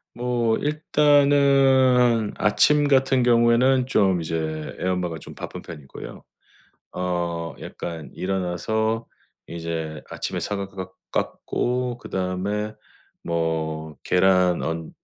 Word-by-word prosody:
뭐 120 -2 0
일단은 140 -6 +4
아침 145 +7 +3
같은 135 -2 +3
경우에는 120 +2 +4
좀 95 -8 +2
이제 80 -1 -3
애 90 - -2
엄마가 90 -3 -1
좀 - - -11
바쁜 - - -7
편이고요. 75 -6 -10 0.7
어 85 -2 -2
약간 80 -3 -7
일어나서 95 +5 -1 0.4
이제 80 -2 -5
아침에 - - -4
사과 100 -1 -3
깎 95 -1 -8 0.2
깎고 125 0 -2
그다음에 100 +3 -3 0.5
뭐 80 -2 -2
계란 90 -1 +3
언 80 0 -3
95 Hz, 205 characters per minute, -23 LUFS, 85-125 Hz, 0.7 s, 일단은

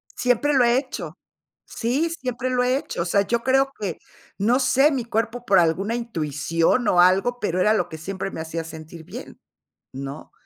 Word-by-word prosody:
Siempre 250 +4 +1
lo 260 -3 +5
he 240 +1 +4
hecho. 265 0 -5 0.5
Sí, 270 +8 -1
siempre 255 -5 -3
lo 250 -1 +2
he 250 +1 +2
hecho. 175 - -4
O - - -2
sea, 200 +3 +2
yo 235 +3 0
creo 270 +2 +2
que 195 -6 -4 0.4
no 230 +6 +3
sé, 270 +2 +4
mi 265 -5 -2
cuerpo 230 +2 -2
por 200 -5 +4
alguna 180 +6 +1
intuición 165 - 0
o 175 - +5
algo, 195 +7 +3
pero 185 -3 -1
era 215 +3 +4
lo - - 0
que 160 - -8
siempre 195 +4 -4
me - - -7
hacía 165 +1 -4
sentir 160 0 -10
bien, - - -10 0.6
¿no? 135 +2 -7
220 Hz, 190 wpm, -23 LUFS, 170-250 Hz, 0.6 s, lo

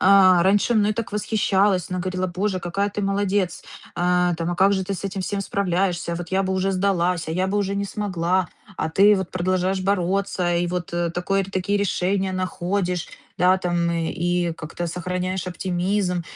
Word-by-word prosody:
э, - - +2 0.4
раньше 200 +5 +3
мной 210 -1 +3
так 230 -1 -4
восхищалась. 200 -3 +1
Она 185 - -2
говорила: 185 0 -2
"Боже, 185 +2 -2
какая 185 +4 -1
ты 205 0 -4
молодец! 195 -2 0 0.3
Э, 180 0 +2
там, 165 +1 -2
а - - -1
как 195 +2 +4
же 190 -1 0
ты 200 +1 -3
с 190 - -7
этим 195 0 -3
всем 200 +2 -2
справляешься? 180 -3 -1
Вот 170 -1 -6
я 190 +1 +2
бы 190 0 -1
уже 190 +1 0
сдалась, 180 -3 0
а - - -2
я 185 +3 0
бы 200 +2 0
уже 200 -1 -1
не 200 0 -1
смогла, 185 -3 -1 0.3
а 160 - -1
ты 200 +6 +5
вот 190 -2 -3
продолжаешь 185 +1 0
бороться, 185 -2 0
и 175 +1 +1
вот 175 0 -3 0.3
такой 195 +2 0
такие 195 +1 -1
решения 190 0 0
находишь, 185 -1 -2 0.3
да, 180 +2 +4
там 175 -2 0
и 170 +1 -1
как-то 165 +2 -5
сохраняешь 180 +2 -3
оптимизм". 180 0 -1
185 Hz, 180 wpm, -23 LUFS, 175-195 Hz, 0.4 s, ты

